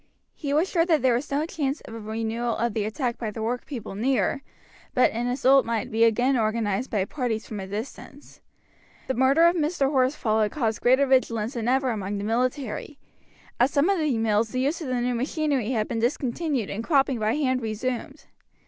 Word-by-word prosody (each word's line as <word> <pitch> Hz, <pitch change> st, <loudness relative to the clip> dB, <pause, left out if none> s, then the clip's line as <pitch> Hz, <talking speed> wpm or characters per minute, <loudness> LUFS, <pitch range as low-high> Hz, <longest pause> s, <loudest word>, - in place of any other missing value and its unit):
He 285 Hz, -3 st, -5 dB
was 310 Hz, +6 st, +2 dB
sure 335 Hz, -4 st, +2 dB
that 320 Hz, -6 st, +2 dB
there 255 Hz, -2 st, +4 dB
was 250 Hz, +5 st, -2 dB
no 285 Hz, +2 st, 0 dB
chance 290 Hz, -3 st, -2 dB
of -, -, -11 dB
a 230 Hz, -, -6 dB
renewal 225 Hz, +2 st, -2 dB
of 235 Hz, -1 st, -1 dB
the 210 Hz, -1 st, -1 dB
attack 240 Hz, +2 st, -2 dB
by 225 Hz, -, -3 dB
the 220 Hz, +1 st, -5 dB
workpeople 245 Hz, -1 st, -4 dB
near, 260 Hz, +6 st, 0 dB, 0.5 s
but 255 Hz, -, +4 dB
an 235 Hz, +2 st, -2 dB
assault 265 Hz, +1 st, +4 dB
might 230 Hz, -2 st, -2 dB
be 225 Hz, +1 st, +3 dB
again 245 Hz, +4 st, +2 dB
organized 220 Hz, 0 st, 0 dB
by 200 Hz, -5 st, 0 dB
parties 230 Hz, -3 st, -3 dB
from 215 Hz, -, -6 dB
a 190 Hz, -, -6 dB
distance. 230 Hz, +7 st, -8 dB, 0.7 s
The 260 Hz, -, 0 dB
murder 265 Hz, +5 st, +4 dB
of 340 Hz, +1 st, +4 dB
Mr. 300 Hz, -4 st, 0 dB
Horsfall 255 Hz, -5 st, +1 dB
had 210 Hz, -, +1 dB
caused 225 Hz, -7 st, -1 dB
greater 260 Hz, +3 st, +4 dB
vigilance 240 Hz, -3 st, +1 dB
than 230 Hz, -2 st, -3 dB
ever 260 Hz, 0 st, +2 dB
among 205 Hz, -2 st, -3 dB
the 200 Hz, -, -4 dB
military. 250 Hz, +4 st, -2 dB, 0.6 s
At 245 Hz, +2 st, +4 dB
some 295 Hz, +6 st, +2 dB
of 390 Hz, -, +1 dB
the 300 Hz, -6 st, +1 dB
mills 220 Hz, 0 st, +1 dB
the 255 Hz, +3 st, -2 dB
use 290 Hz, +6 st, -1 dB
of 310 Hz, -, -4 dB
the 250 Hz, -1 st, -1 dB
new 245 Hz, +1 st, 0 dB
machinery 270 Hz, -1 st, -1 dB
had 220 Hz, -4 st, 0 dB
been 230 Hz, -, -2 dB
discontinued 255 Hz, -, -1 dB
and 215 Hz, +3 st, -4 dB
cropping 270 Hz, -3 st, +2 dB
by 215 Hz, +1 st, +1 dB
hand 260 Hz, -4 st, 0 dB
resumed. 250 Hz, +6 st, -4 dB
245 Hz, 200 wpm, -25 LUFS, 225-275 Hz, 0.7 s, there